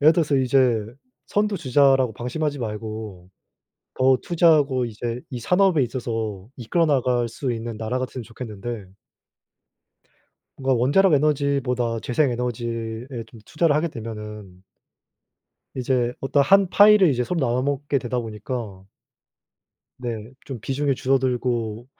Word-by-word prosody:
예를 155 Hz, +3 st, +7 dB
들어서 155 Hz, -4 st, +1 dB
이제 125 Hz, -4 st, +3 dB, 0.4 s
선두 205 Hz, -1 st, 0 dB
주자라고 135 Hz, -4 st, +3 dB
방심하지 145 Hz, +5 st, -3 dB
말고 110 Hz, -4 st, -6 dB, 0.6 s
더 130 Hz, 0 st, +4 dB
투자하고 150 Hz, -7 st, +3 dB
이제 120 Hz, +2 st, -4 dB
이 125 Hz, -2 st, -5 dB
산업에 180 Hz, -, +3 dB
있어서 115 Hz, -5 st, -4 dB
이끌어 150 Hz, +8 st, 0 dB
나갈 125 Hz, -4 st, +1 dB
수 125 Hz, +2 st, -3 dB
있는 115 Hz, -1 st, -5 dB
나라 115 Hz, +3 st, -2 dB
같으면 130 Hz, -1 st, -4 dB
좋겠는데 115 Hz, -2 st, -7 dB, 1.7 s
뭔가 130 Hz, -2 st, +1 dB
원자력 165 Hz, +9 st, +4 dB
에너지보다 135 Hz, -5 st, +1 dB
재생 135 Hz, +2 st, +1 dB
에너지에 115 Hz, -1 st, -3 dB, 0.2 s
좀 110 Hz, 0 st, -15 dB
투자를 155 Hz, -1 st, +1 dB
하게 160 Hz, +3 st, +1 dB
되면은 105 Hz, -, -8 dB, 1.1 s
이제 125 Hz, -1 st, 0 dB
어떤 140 Hz, +1 st, +2 dB
한 195 Hz, +5 st, +5 dB
파이를 205 Hz, -3 st, +6 dB
이제 125 Hz, -2 st, 0 dB
서로 175 Hz, +2 st, -2 dB
나눠 125 Hz, 0 st, +1 dB
먹게 140 Hz, 0 st, -1 dB
되다 125 Hz, 0 st, -3 dB
보니까 110 Hz, -3 st, -6 dB, 1.1 s
네. 115 Hz, -2 st, -5 dB, 0.2 s
좀 130 Hz, -5 st, -6 dB
'비중이 135 Hz, +2 st, -1 dB
줄어들고 125 Hz, -4 st, -1 dB
125 Hz, 285 characters per minute, -23 LUFS, 115-140 Hz, 1.7 s, 예를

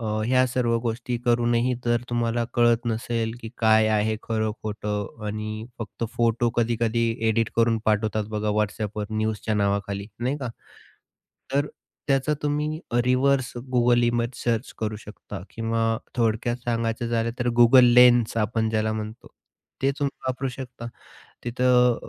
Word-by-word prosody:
अ, 115 Hz, -, -4 dB, 0.2 s
ह्या 130 Hz, +1 st, +4 dB
सर्व 120 Hz, -2 st, +1 dB
गोष्टी 120 Hz, +1 st, -2 dB
करून 120 Hz, 0 st, +2 dB
ही 125 Hz, +2 st, +2 dB
जर 120 Hz, 0 st, +1 dB
तुम्हाला 120 Hz, 0 st, 0 dB
कळत 120 Hz, 0 st, +3 dB
नसेल, 115 Hz, 0 st, -1 dB
की 115 Hz, -, -7 dB
काय 110 Hz, -1 st, +5 dB
आहे 110 Hz, 0 st, +1 dB
खरं-खोटं 105 Hz, -1 st, -3 dB
आणि 110 Hz, +1 st, -4 dB
फक्त 115 Hz, +1 st, -5 dB
फोटो 115 Hz, 0 st, +2 dB
कधी-कधी 115 Hz, 0 st, +1 dB, 0.2 s
एडिट 115 Hz, 0 st, +1 dB
करून 115 Hz, 0 st, +3 dB
पाठवतात 110 Hz, 0 st, +1 dB
बघा 105 Hz, 0 st, -1 dB
WhatsAppवर 105 Hz, 0 st, -2 dB
न्यूजच्या 110 Hz, 0 st, -1 dB
नावाखाली, 100 Hz, 0 st, -1 dB
नाही 130 Hz, +4 st, 0 dB
का. 130 Hz, -4 st, -4 dB, 1.0 s
तर 140 Hz, +1 st, +2 dB, 0.4 s
त्याचा 135 Hz, +2 st, +2 dB
तुम्ही 150 Hz, +2 st, -1 dB
अ, 120 Hz, -, 0 dB
रिव्हर्स 130 Hz, 0 st, +2 dB, 0.2 s
Google 120 Hz, 0 st, +4 dB
इमेज 120 Hz, 0 st, +1 dB
सर्च 115 Hz, -2 st, -1 dB
करू 110 Hz, -1 st, -2 dB
शकता 105 Hz, -2 st, -9 dB
किंवा 115 Hz, 0 st, 0 dB, 0.2 s
थोडक्यात 115 Hz, 0 st, +1 dB
सांगायचं 115 Hz, 0 st, -1 dB
झालं 115 Hz, 0 st, 0 dB
तर 120 Hz, 0 st, 0 dB
Google 125 Hz, +2 st, +8 dB
लेन्स 120 Hz, -2 st, +6 dB
आपण 110 Hz, +1 st, 0 dB
ज्याला 110 Hz, 0 st, 0 dB
म्हणतो. 110 Hz, 0 st, -6 dB, 0.5 s
ते 135 Hz, -, +3 dB
तुम्ही 140 Hz, -1 st, 0 dB, 0.2 s
वापरू 130 Hz, +1 st, -1 dB
शकता. 125 Hz, -2 st, -8 dB, 0.6 s
तिथं 125 Hz, 0 st, +3 dB
115 Hz, 140 wpm, -25 LUFS, 110-120 Hz, 1.0 s, Google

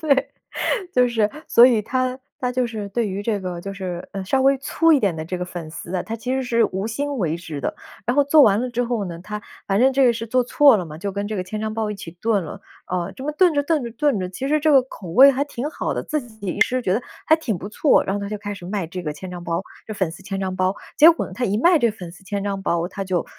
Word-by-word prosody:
对。 280 Hz, -4 st, +2 dB, 0.7 s
就 250 Hz, 0 st, +5 dB
是 220 Hz, -3 st, +1 dB, 0.2 s
所 240 Hz, +1 st, +7 dB
以 230 Hz, -4 st, +3 dB
他 255 Hz, +2 st, -1 dB, 0.2 s
他 250 Hz, -, 0 dB
就 250 Hz, -1 st, 0 dB
是 215 Hz, -3 st, -5 dB
对 225 Hz, +2 st, -1 dB
于 195 Hz, +2 st, -4 dB
这 215 Hz, -1 st, 0 dB
个 180 Hz, -2 st, -5 dB
就 195 Hz, +2 st, -6 dB
是， 185 Hz, -2 st, -5 dB
呃， 195 Hz, -1 st, -4 dB
稍 265 Hz, +7 st, +1 dB
微 275 Hz, 0 st, +4 dB
粗 325 Hz, +4 st, +2 dB
一 290 Hz, -, +6 dB
点 195 Hz, -7 st, +1 dB
的 160 Hz, 0 st, -5 dB
这 180 Hz, +2 st, -4 dB
个 180 Hz, -, -2 dB
粉 175 Hz, -3 st, -7 dB
丝 170 Hz, +3 st, -7 dB
啊， 180 Hz, -, 0 dB
他 225 Hz, +1 st, -5 dB
其 250 Hz, +3 st, -3 dB
实 265 Hz, -, 0 dB
是 235 Hz, -2 st, +2 dB
无 190 Hz, +3 st, -2 dB
心 285 Hz, +5 st, -3 dB
为 165 Hz, -4 st, 0 dB
之 160 Hz, -4 st, -7 dB
的， -, -, -2 dB, 0.3 s
然 245 Hz, -, +1 dB
后 285 Hz, -, +5 dB
做 295 Hz, +1 st, +6 dB
完 210 Hz, -1 st, +5 dB
了 255 Hz, -, -2 dB
之 245 Hz, +1 st, 0 dB
后 230 Hz, -4 st, -1 dB
呢， 170 Hz, -2 st, -6 dB
他 210 Hz, +2 st, -6 dB, 0.3 s
反 195 Hz, 0 st, +1 dB
正 265 Hz, +1 st, +5 dB
这 270 Hz, 0 st, +4 dB
个 240 Hz, -, +5 dB
是 230 Hz, 0 st, -5 dB
做 250 Hz, +2 st, +2 dB
错 280 Hz, +1 st, +5 dB
了 180 Hz, -, -3 dB
嘛， 155 Hz, 0 st, -9 dB
就 200 Hz, +2 st, -4 dB
跟 200 Hz, +1 st, -3 dB
这 215 Hz, -, -3 dB
个 185 Hz, -, -2 dB
千 215 Hz, +3 st, -5 dB
张 220 Hz, 0 st, -2 dB
包 220 Hz, -1 st, -1 dB
一 -, -, -3 dB
起 195 Hz, -4 st, -8 dB
炖 200 Hz, 0 st, 0 dB
了， -, -, -8 dB, 0.3 s
啊， 180 Hz, +1 st, -2 dB
这 265 Hz, -, -9 dB
么 300 Hz, -, -1 dB
炖 355 Hz, +1 st, +4 dB
着 285 Hz, -, +2 dB
炖 305 Hz, -2 st, 0 dB
着 235 Hz, -, -5 dB
炖 270 Hz, -2 st, +1 dB
着， 185 Hz, -1 st, -3 dB
其 265 Hz, +8 st, -4 dB
实 305 Hz, +1 st, +3 dB
这 310 Hz, +1 st, +3 dB
个 265 Hz, -2 st, +7 dB
口 205 Hz, -8 st, -11 dB
味 265 Hz, +11 st, +8 dB
还 275 Hz, +2 st, 0 dB
挺 290 Hz, 0 st, -4 dB
好 -, -, -3 dB
的， -, -, -2 dB
自 305 Hz, -, -2 dB
己 220 Hz, -4 st, -11 dB
一 175 Hz, -, -3 dB
吃 255 Hz, 0 st, +3 dB
觉 185 Hz, -, 0 dB
得 240 Hz, -, -1 dB, 0.2 s
还 315 Hz, -, +6 dB
挺 230 Hz, -, -2 dB
不 200 Hz, -, -7 dB
错， 280 Hz, +7 st, +3 dB
然 195 Hz, -, -1 dB
后 205 Hz, -, -2 dB
他 200 Hz, -, -4 dB
就 210 Hz, -, -3 dB
开 205 Hz, 0 st, -5 dB
始 180 Hz, -, -11 dB
卖 195 Hz, -3 st, -2 dB
这 180 Hz, +2 st, -6 dB
个 150 Hz, -2 st, -3 dB
千 185 Hz, +4 st, -9 dB
张 175 Hz, -1 st, -7 dB
包 170 Hz, +2 st, -1 dB, 0.2 s
这 215 Hz, -, -5 dB
粉 190 Hz, -5 st, -1 dB
丝 170 Hz, +4 st, -11 dB
千 195 Hz, 0 st, -4 dB
张 185 Hz, -1 st, -2 dB
包。 185 Hz, +1 st, +1 dB, 0.2 s
结 320 Hz, +3 st, +9 dB
果 335 Hz, -, -2 dB
呢， -, -, -11 dB
他 250 Hz, -, -2 dB
一 205 Hz, 0 st, 0 dB
卖 340 Hz, +4 st, +5 dB
这 235 Hz, -3 st, +3 dB
个 215 Hz, -, -13 dB
粉 175 Hz, -2 st, -8 dB
丝 195 Hz, -, -16 dB
千 200 Hz, 0 st, -3 dB
张 195 Hz, -1 st, -3 dB
包， 170 Hz, -1 st, 0 dB
他 195 Hz, +1 st, -5 dB
就 185 Hz, -2 st, -1 dB
210 Hz, 325 characters per minute, -22 LUFS, 185-255 Hz, 0.7 s, 结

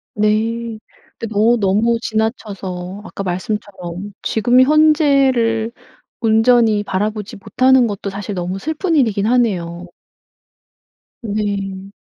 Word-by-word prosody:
네. 220 Hz, +2 st, 0 dB, 0.4 s
근데 225 Hz, -1 st, -6 dB
어 225 Hz, +4 st, +4 dB
너무 215 Hz, +3 st, +2 dB
지나쳐서 200 Hz, -5 st, -4 dB
아까 200 Hz, -, -7 dB
말씀처럼 190 Hz, 0 st, -5 dB
지금 245 Hz, +3 st, +3 dB
현재를 275 Hz, -6 st, +3 dB, 0.5 s
온전히 225 Hz, -1 st, +3 dB
바라보지 210 Hz, +2 st, -3 dB
못하는 255 Hz, +4 st, +3 dB
것도 200 Hz, -1 st, -4 dB
사실 200 Hz, 0 st, -5 dB
너무 180 Hz, +1 st, -3 dB
슬픈 320 Hz, -, -2 dB
일이긴 220 Hz, -8 st, +2 dB
하네요. 185 Hz, -8 st, 0 dB, 1.4 s
네. 200 Hz, -2 st, -3 dB
215 Hz, 230 characters per minute, -18 LUFS, 195-235 Hz, 1.4 s, 어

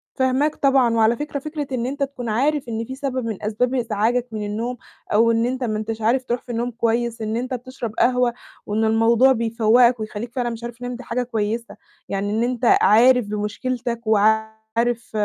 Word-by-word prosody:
فاهماك 265 Hz, +3 st, +1 dB
طبعًا، 265 Hz, -4 st, +3 dB
وعلى 225 Hz, +1 st, +4 dB
فكرة 295 Hz, 0 st, -4 dB
فكرة 300 Hz, -1 st, -5 dB
إن 245 Hz, -2 st, -1 dB
أنت 280 Hz, +2 st, -2 dB
تكون 255 Hz, -4 st, -5 dB
عارف 275 Hz, +4 st, 0 dB
إن 225 Hz, 0 st, -3 dB
في 260 Hz, -, -7 dB
سبب 260 Hz, -3 st, -3 dB
من 220 Hz, -3 st, -5 dB
أسباب 240 Hz, +5 st, 0 dB
إزعاجك 235 Hz, +1 st, 0 dB
من 210 Hz, -1 st, -4 dB
النوم 230 Hz, +4 st, -3 dB, 0.4 s
أو 230 Hz, +2 st, +5 dB
إن 230 Hz, +1 st, +1 dB
أنت 255 Hz, +1 st, -2 dB
ما 215 Hz, -3 st, -1 dB
أنتش 220 Hz, +1 st, -4 dB
عارف 250 Hz, +4 st, +2 dB
تروح 240 Hz, -1 st, -2 dB
في 245 Hz, -, -9 dB
النوم 240 Hz, +1 st, -2 dB
كويس، 235 Hz, 0 st, -1 dB
إن 215 Hz, +1 st, -2 dB
أنت 255 Hz, +2 st, -3 dB
بتشرب 250 Hz, -3 st, -6 dB
قهوة، 250 Hz, -1 st, +3 dB, 0.3 s
وإن 215 Hz, +2 st, -1 dB
الموضوع 230 Hz, +4 st, +4 dB
بيفوقك 230 Hz, +1 st, +3 dB
ويخليك 215 Hz, +2 st, -5 dB
فعلًا 245 Hz, -2 st, -1 dB
مش 230 Hz, 0 st, -7 dB
عارف 235 Hz, 0 st, -6 dB
تنام 245 Hz, 0 st, -5 dB
دي 250 Hz, -, -9 dB
حاجة 245 Hz, +2 st, -2 dB
كويسة، 230 Hz, 0 st, -3 dB, 0.3 s
يعني 200 Hz, +1 st, -2 dB
إن 225 Hz, +2 st, +1 dB
أنت 245 Hz, 0 st, -1 dB, 0.2 s
عارف 245 Hz, +2 st, +5 dB
بمشكلتك 235 Hz, +3 st, -3 dB
وعارف 220 Hz, +2 st, +1 dB
235 Hz, 190 wpm, -22 LUFS, 220-250 Hz, 0.4 s, أو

